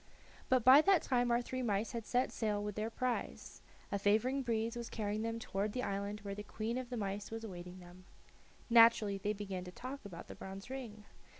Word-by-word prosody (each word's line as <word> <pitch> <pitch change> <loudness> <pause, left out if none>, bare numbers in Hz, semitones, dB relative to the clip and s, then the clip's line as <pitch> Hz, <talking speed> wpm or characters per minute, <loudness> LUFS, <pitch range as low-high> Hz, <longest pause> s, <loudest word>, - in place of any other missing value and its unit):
But 255 -2 +4
by 260 +5 +9
that 380 0 +4
time 245 -1 +2
our 240 +1 +2
three 255 +1 -4
mice 215 -2 0
had 230 -3 -5
set 250 +1 +1
sail 210 -2 -1
with 210 0 -3
their 215 +3 -2
prize. 250 +1 -3 0.3
A 200 - 0
favoring 220 +7 +2
breeze 230 -1 -1
was 235 -1 -5
carrying 210 -1 -2
them 230 0 -2
toward 205 -1 -2
the 250 - -2
island 200 +1 -3
where 200 -1 -5
the 205 - -6
queen 220 +3 -3
of 255 -2 -6
the 245 - -4
mice 205 -1 -3
was 225 0 -6
awaiting 180 -3 -8
them. 180 +1 -14 0.6
Naturally 230 -4 +6
they 205 +2 -1
began 195 -3 -5
to 180 - -8
talk 255 +8 -7
about 180 -5 -9
the - - -8
bronze 195 +5 -8
ring. 225 -6 -7
215 Hz, 210 wpm, -35 LUFS, 200-240 Hz, 0.6 s, by